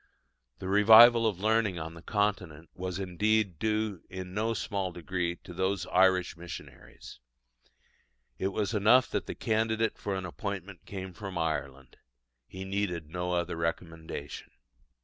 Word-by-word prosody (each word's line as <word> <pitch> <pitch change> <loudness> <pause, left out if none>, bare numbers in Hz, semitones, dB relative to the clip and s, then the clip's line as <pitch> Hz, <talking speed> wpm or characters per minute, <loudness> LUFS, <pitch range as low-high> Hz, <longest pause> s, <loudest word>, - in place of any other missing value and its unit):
The 95 - -7
revival 115 +4 +8
of 100 -5 -2
learning 110 -2 +1
on 80 0 -5
the 85 - -12
Continent 95 -6 -2
was 90 0 -4
indeed 100 0 0
due 110 -4 -1
in 95 -1 -7
no 110 +3 0
small 100 -4 -2
degree 85 0 -3
to 90 - -10
those 95 +1 -1
Irish 95 -1 +3
missionaries. 85 -5 -11 1.2
It 95 - 0
was 100 +3 -2
enough 115 +5 +4
that - - -2
the - - -5
candidate 110 0 0
for 100 -2 -2
an 95 -1 -4
appointment 95 0 -6
came 95 -2 -6
from 95 0 -7
Ireland: 70 -5 -3 0.5
he 95 +1 -8
needed 95 -5 -3
no 90 +1 -2
other 85 0 -1
recommendation. 80 -3 -5
95 Hz, 140 wpm, -29 LUFS, 85-105 Hz, 1.2 s, revival